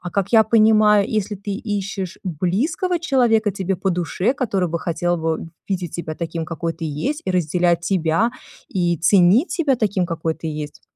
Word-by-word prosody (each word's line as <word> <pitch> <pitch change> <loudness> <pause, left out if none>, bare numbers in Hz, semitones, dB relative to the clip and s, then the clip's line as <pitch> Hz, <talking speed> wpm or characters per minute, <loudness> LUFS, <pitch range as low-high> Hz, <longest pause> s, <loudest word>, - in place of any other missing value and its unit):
А, 180 - -6
как 200 +1 -1
я 220 -1 +7
понимаю, 215 -2 +4
если 215 -1 -1
ты 200 +1 -7 0.3
ищешь 190 -2 -5
близкого 210 - -1
человека, 235 -8 +2
тебе 190 -1 -2
по 190 +2 -1
душе, 180 - 0
который 200 -10 -1
бы 170 - -2
хотел 175 +1 -1
бы 160 0 -2 0.2
видеть 180 -4 -3
себя 160 -2 -4
таким, 165 0 -4
какой 165 +1 -3
ты 165 - -7
есть, 160 - -3
и 190 - -1
разделять 175 0 +1
тебя 170 +5 +1 0.4
и 175 -2 0
ценить 195 - +4
тебя 300 -6 +1
таким, 200 -6 0
какой 165 -1 -2
ты 160 - -8
есть. 150 -1 -6
185 Hz, 175 wpm, -21 LUFS, 170-215 Hz, 0.4 s, я